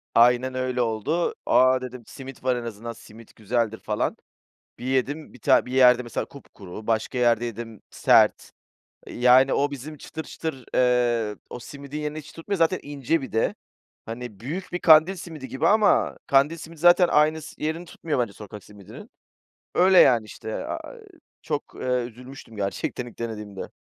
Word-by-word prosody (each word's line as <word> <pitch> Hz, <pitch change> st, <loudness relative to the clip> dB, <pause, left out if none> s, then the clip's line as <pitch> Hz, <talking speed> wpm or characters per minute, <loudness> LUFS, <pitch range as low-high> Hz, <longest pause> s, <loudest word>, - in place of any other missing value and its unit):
Aynen 125 Hz, +2 st, +4 dB
öyle 130 Hz, -1 st, -1 dB
oldu. 120 Hz, +10 st, -1 dB
"A," 130 Hz, 0 st, +4 dB
dedim, 125 Hz, -1 st, -8 dB
"simit 135 Hz, -1 st, -11 dB
var, 130 Hz, -1 st, +2 dB
en 120 Hz, -, -4 dB
azından 115 Hz, 0 st, -6 dB
simit 115 Hz, 0 st, -16 dB
güzeldir 110 Hz, 0 st, -1 dB
falan." 105 Hz, -1 st, -2 dB, 0.6 s
Bir 125 Hz, -, -7 dB
yedim, 135 Hz, +4 st, -1 dB
bir 125 Hz, -, -15 dB
ta -, -, +4 dB
bir 125 Hz, -, -8 dB
yerde, 125 Hz, -1 st, +5 dB
mesela, 120 Hz, -, -4 dB
kupkuru, 105 Hz, -6 st, -12 dB
başka 115 Hz, +3 st, -1 dB
yerde 120 Hz, -1 st, +2 dB
yedim, 115 Hz, -2 st, -7 dB
sert. -, -, +3 dB, 0.6 s
Yani, 125 Hz, +2 st, +4 dB
o 145 Hz, +1 st, +1 dB
bizim 145 Hz, +3 st, -8 dB
çıtır 160 Hz, -, -7 dB
çıtır, 135 Hz, -7 st, -6 dB
eee, 120 Hz, -4 st, +2 dB
o 125 Hz, -, -7 dB
simidin 140 Hz, +3 st, -8 dB
yerini 150 Hz, 0 st, -4 dB
hiç 150 Hz, -1 st, -9 dB
tutmuyor. 195 Hz, +4 st, -4 dB
Zaten 165 Hz, +2 st, +2 dB
ince 145 Hz, +2 st, -1 dB
bir 130 Hz, -, -7 dB
de, 110 Hz, -, 0 dB, 0.5 s
hani 115 Hz, -3 st, -7 dB
büyük 165 Hz, -, -6 dB
bir 180 Hz, -, -1 dB
kandil 160 Hz, +3 st, +6 dB
simidi 160 Hz, -6 st, -8 dB
gibi 140 Hz, +5 st, 0 dB
ama 210 Hz, +2 st, +3 dB
kandil 140 Hz, +4 st, +3 dB
simidi 160 Hz, +1 st, -11 dB
zaten 175 Hz, +2 st, +6 dB
aynı 155 Hz, +1 st, +3 dB
s 155 Hz, -, -11 dB
yerini 160 Hz, +3 st, -2 dB
tutmuyor 155 Hz, -4 st, -3 dB
bence 110 Hz, -5 st, -1 dB
sokak 105 Hz, -1 st, -11 dB
simidinin. 105 Hz, -2 st, -13 dB, 0.7 s
Öyle, 185 Hz, +1 st, +5 dB
yani, 120 Hz, -4 st, +6 dB
işte, 110 Hz, +1 st, -8 dB
a -, -, -6 dB
eee, 455 Hz, -, -15 dB, 0.4 s
çok, 150 Hz, -2 st, -4 dB
eee, -, -, -6 dB
üzülmüştüm 125 Hz, -1 st, -5 dB
gerçekten 100 Hz, +4 st, -3 dB
ilk 120 Hz, -, -13 dB
denediğimde. 105 Hz, -4 st, -6 dB
125 Hz, 170 wpm, -24 LUFS, 115-150 Hz, 0.7 s, kandil